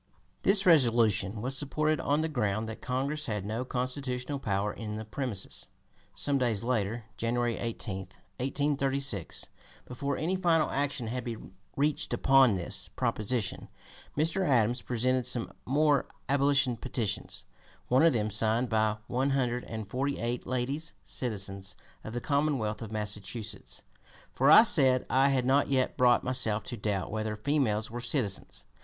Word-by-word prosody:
This 195 0 +4
resolution 115 - +3
was 130 +2 -2
supported 155 +2 0
on 145 +2 +1
the 160 - 0
ground 110 -7 -1
that 110 - -7
(p. - - -13
249) 130 0 0
Congress 150 +2 -2
had 105 -4 -3
no 110 +4 -2
constitutional 130 +1 -3
power 100 -3 -1
in 105 -2 -6
the 110 +1 -5
premises. 110 -3 -4 0.5
Some 140 -1 0
days 115 -5 0
later, 115 -2 -1
January 120 0 0
18, 115 -4 -3 0.4
1836, 135 - -1 0.4
before 140 +2 -3
any 175 +4 0
final 170 -4 +2
action 140 -3 -1
had 125 +3 -3
been 115 -5 -7 0.2
reached 145 +1 0
upon 135 -5 +5
this 85 -2 -3
proposition, 110 -2 -1 0.5
Mr. 165 +5 +2
Adams 120 -6 +2
presented 125 +1 0
some 125 -2 -1
more 145 +1 +3 0.2
abolition 140 -2 +2
petitions, 110 -6 -3 0.4
one 130 +2 +4
of 165 - +6
them 110 -3 -1
signed 110 +4 +3
by 110 -1 +1
"one 130 +4 0
hundred 125 -3 0
and 110 -2 -6
forty 135 +6 -2
eight 120 +1 -3
ladies, 135 +6 -2
citizens 100 -5 -3 0.3
of 110 - -7
the 120 - -3
Commonwealth 140 -8 0
of 110 -2 -7
Massachusetts; 105 0 -5 0.5
for, 135 +2 +2
I 190 - +10
said, 135 - +4
I 135 +2 +4
had 130 -2 +1
not 135 +2 +3
yet 130 -2 +1
brought 125 -1 +4
myself 115 -5 0
to 125 - -6
doubt 100 -3 -2
whether 110 0 -2
females 110 -3 0
were 120 +1 -5
citizens." 120 -6 -2
125 Hz, 150 wpm, -29 LUFS, 110-140 Hz, 0.5 s, I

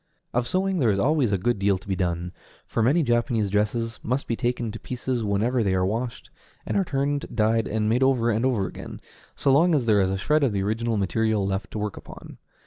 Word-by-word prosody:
Of 120 0 0
sewing 190 +2 0
there 120 -6 +3
is 100 - +2
always 135 +1 +2
a 100 - +2
good 115 +2 0
deal 100 -1 +2
to 95 - -16
be 95 - 0
done, 90 -1 -2 0.3
for - - -2
many 145 +9 +3
Japanese 120 -4 +1
dresses 115 +3 -1
must 130 +4 -1
be 115 - -1
taken 120 -2 -2
to 110 - -8
pieces 125 -1 -3
whenever 110 +5 +1
they 95 -3 +1
are 95 0 +2
washed, 115 +5 -4 0.3
and - - -3
are 195 - +3
turned, 140 -2 -1
dyed, 110 0 +2
and 105 0 -1
made 115 +4 +2
over 125 -3 +3
again 110 +2 0
and 120 -7 +1
again, - - -9 0.3
so 135 - +1
long 165 +5 +4
as 135 -5 +1
there 105 -3 +4
is 95 - +1
a 95 - -1
shred 150 +9 +1
of 125 -6 +2
the 100 -1 0
original 110 +2 -1
material 105 +1 +1
left 95 +1 -2
to - - -6
work 105 -1 -3
upon. - - -12
115 Hz, 230 wpm, -25 LUFS, 100-130 Hz, 0.3 s, long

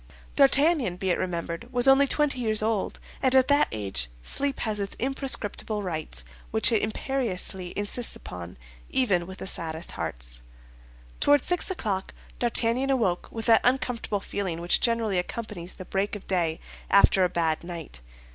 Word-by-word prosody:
D'Artagnan, 275 - +4
be 190 0 0
it - - 0
remembered, 170 +5 -4
was 245 +1 +4
only 270 +1 +6
twenty 290 -2 +2
years 215 -3 +2
old, 220 -2 -1 0.2
and 260 0 +3
at 260 -1 +5
that 285 +1 +5
age 95 - -3
sleep 280 - -2
has 215 -2 -1
its 200 -1 -3
imprescriptible 235 -5 -2
rights 155 - -3 0.3
which 110 - +4
it 225 - +3
imperiously 210 -6 -2
insists 205 +4 0
upon, 90 -1 -9 0.3
even 190 -10 +1
with 190 0 -9
the - - -6
saddest 160 -3 -2
hearts. - - -4 0.8
Toward 290 -2 +5
six 355 +1 0
o'clock 205 - -3 0.2
D'Artagnan 240 +2 +2
awoke 220 -10 +1
with 225 -1 -5
that 225 -2 +6
uncomfortable 245 -5 0
feeling 190 -5 -3
which 175 +1 +3
generally 225 -5 +1
accompanies 185 -2 -5
the 185 - -9
break 195 +3 -1
of 205 - -10
day 170 -4 0 0.3
after 195 -1 +5
a 180 - +3
bad 165 -2 0
night. 165 - -8
205 Hz, 155 wpm, -26 LUFS, 175-250 Hz, 0.8 s, only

